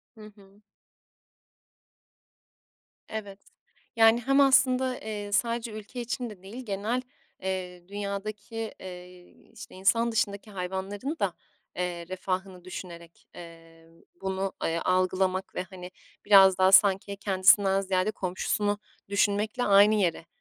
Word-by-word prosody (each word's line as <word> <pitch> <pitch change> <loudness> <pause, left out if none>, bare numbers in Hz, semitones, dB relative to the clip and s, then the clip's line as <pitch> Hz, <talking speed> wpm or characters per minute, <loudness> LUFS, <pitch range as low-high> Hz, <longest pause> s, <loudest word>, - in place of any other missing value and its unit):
Hı 220 - -14
hı. 200 0 -20 2.5
Evet. 205 -3 -6 0.6
Yani 225 +1 +6
hem 275 +3 +3
aslında, 260 -2 +3
eee, 210 -1 -6
sadece 235 +1 0
ülke 215 +4 -8
için 240 0 -4
de 195 -4 -13
değil, 225 +7 -9
genel, 215 +5 -2 0.4
eee, 180 -2 -5
dünyadaki, 205 +2 -5
eee, 180 -1 -10 0.3
işte - - -12
insan 210 +5 +2
dışındaki 205 -1 -2
hayvanların 195 - -4
da, - - 0 0.4
eee, 175 -1 -3
refahını 185 0 -4
düşünerek, 170 -2 -10
emm, 165 -1 -14 0.2
bunu, 190 0 -2
eee, 165 +1 0
algılamak 185 +1 0
ve - - -2
hani, 185 -1 -10 0.3
biraz 195 -2 +7
daha 190 0 +4
sanki 195 +1 +5
kendisinden 195 0 +4
ziyade 190 +1 0
komşusunu 205 +2 -1 0.3
düşünmekle 205 +4 0
aynı 205 +1 +6
yere, 175 -5 0
195 Hz, 115 wpm, -27 LUFS, 185-215 Hz, 2.5 s, biraz